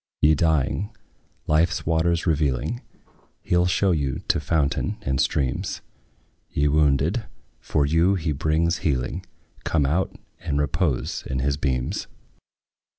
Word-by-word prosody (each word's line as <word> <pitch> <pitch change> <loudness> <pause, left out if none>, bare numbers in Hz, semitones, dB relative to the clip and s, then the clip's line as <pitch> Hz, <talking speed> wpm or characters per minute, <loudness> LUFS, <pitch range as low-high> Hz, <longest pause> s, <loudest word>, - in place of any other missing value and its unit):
Ye 75 +1 +5
dying, 80 +5 +1 0.6
life's 80 +3 +2
waters 80 +1 +1
revealing, 80 - 0 0.6
He - - 0
'll 90 0 +4
show 95 +1 +2
you 70 -6 -1
to - - +3
fountain 80 +6 0
and 65 -5 +1
streams: 65 -4 -1 0.7
Ye 75 +1 +1
wounded, 75 - +2 0.3
for 70 - 0
you 85 +6 +3
he 80 -4 -1
brings 80 +3 +1
healing; 65 -6 -1 0.4
Come 75 -4 +1
out 85 +7 0 0.2
and 75 -5 -2
repose 75 -1 -1
in 65 - -2
his 70 +2 +1
beams. 65 -3 -2
75 Hz, 125 wpm, -24 LUFS, 70-85 Hz, 0.7 s, Ye